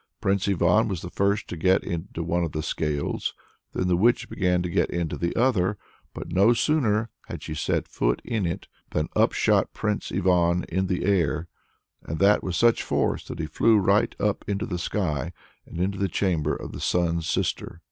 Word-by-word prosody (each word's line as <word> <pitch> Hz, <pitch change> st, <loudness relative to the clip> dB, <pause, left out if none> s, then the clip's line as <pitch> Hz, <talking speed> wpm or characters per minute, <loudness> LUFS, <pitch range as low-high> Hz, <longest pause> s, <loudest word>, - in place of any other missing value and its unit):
Prince 100 Hz, 0 st, +1 dB
Ivan 95 Hz, +2 st, +3 dB
was 95 Hz, -5 st, -4 dB
the 90 Hz, -, -7 dB
first 100 Hz, +1 st, 0 dB
to -, -, -4 dB
get 95 Hz, +3 st, +2 dB
into 85 Hz, -1 st, -4 dB
one 85 Hz, +1 st, 0 dB
of 80 Hz, -, -3 dB
the 75 Hz, -, -2 dB
scales; 75 Hz, -2 st, -2 dB, 0.4 s
then 90 Hz, -, -1 dB
the 90 Hz, -, +3 dB
witch 115 Hz, +7 st, +3 dB
began 90 Hz, -2 st, +1 dB
to 90 Hz, -, -3 dB
get -, -, +1 dB
into 85 Hz, -2 st, -2 dB
the 85 Hz, 0 st, -2 dB
other. 105 Hz, -6 st, +2 dB, 0.4 s
But -, -, -6 dB
no 100 Hz, +6 st, +5 dB
sooner 115 Hz, -4 st, +1 dB, 0.2 s
had -, -, -7 dB
she -, -, -5 dB
set 75 Hz, -, -1 dB
foot -, -, 0 dB
in 110 Hz, -7 st, -1 dB
it 85 Hz, -, -4 dB, 0.2 s
than 75 Hz, 0 st, -1 dB
up -, -, +4 dB
shot -, -, +2 dB
Prince 105 Hz, -1 st, -2 dB
Ivan 90 Hz, -2 st, +2 dB
in 95 Hz, +2 st, 0 dB
the 90 Hz, -1 st, -1 dB
air, 85 Hz, -4 st, +1 dB, 0.5 s
and 80 Hz, -, -4 dB
that 100 Hz, +3 st, +4 dB
with 90 Hz, -2 st, -2 dB
such 115 Hz, +3 st, +4 dB
force -, -, -1 dB
that -, -, -6 dB
he -, -, -2 dB
flew 115 Hz, -1 st, +3 dB
right 100 Hz, +1 st, +2 dB
up 105 Hz, -1 st, 0 dB
into 100 Hz, +2 st, -1 dB
the 90 Hz, -6 st, -4 dB
sky, 85 Hz, -3 st, -2 dB, 0.3 s
and -, -, -8 dB
into 95 Hz, +2 st, -1 dB
the 100 Hz, -, +1 dB
chamber 80 Hz, -5 st, 0 dB
of -, -, -7 dB
the -, -, -8 dB
Sun's 85 Hz, -2 st, 0 dB
Sister. 85 Hz, -, -2 dB
90 Hz, 200 wpm, -25 LUFS, 85-100 Hz, 0.5 s, no